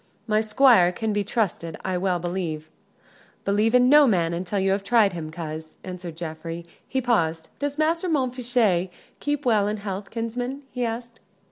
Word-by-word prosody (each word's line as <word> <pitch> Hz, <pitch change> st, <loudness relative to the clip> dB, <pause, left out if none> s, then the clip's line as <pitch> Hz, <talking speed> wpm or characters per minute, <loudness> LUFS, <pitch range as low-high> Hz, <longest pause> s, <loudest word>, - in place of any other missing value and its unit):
My 215 Hz, -1 st, +2 dB
squire 220 Hz, -4 st, +5 dB
can 220 Hz, +3 st, -2 dB
be 205 Hz, 0 st, +1 dB
trusted, 190 Hz, -6 st, -2 dB
I 190 Hz, -1 st, 0 dB
well 180 Hz, 0 st, +1 dB
believe." 170 Hz, -3 st, -4 dB, 0.7 s
"Believe 210 Hz, +4 st, +2 dB
in 250 Hz, 0 st, +6 dB
no 295 Hz, +1 st, +7 dB
man 170 Hz, -6 st, +2 dB
until 180 Hz, +4 st, -3 dB
you 195 Hz, 0 st, +2 dB
have 195 Hz, +1 st, 0 dB
tried 210 Hz, -3 st, +4 dB
him, 160 Hz, -2 st, -5 dB
coz," 155 Hz, -1 st, -7 dB
answered 180 Hz, -3 st, -7 dB
Geoffrey. 165 Hz, 0 st, -6 dB, 0.2 s
He 265 Hz, -, -1 dB
paused. 165 Hz, -10 st, 0 dB
"Does 285 Hz, 0 st, -2 dB
Master 330 Hz, +3 st, +1 dB
Montfichet 245 Hz, -, +1 dB, 0.3 s
keep 290 Hz, -1 st, -2 dB
well 215 Hz, -4 st, +3 dB
in 210 Hz, +1 st, -1 dB
health, 200 Hz, -1 st, -5 dB
kinsman?" 245 Hz, +4 st, -4 dB
he 250 Hz, -, -2 dB
asked. 235 Hz, 0 st, -4 dB
205 Hz, 165 wpm, -24 LUFS, 175-245 Hz, 0.7 s, no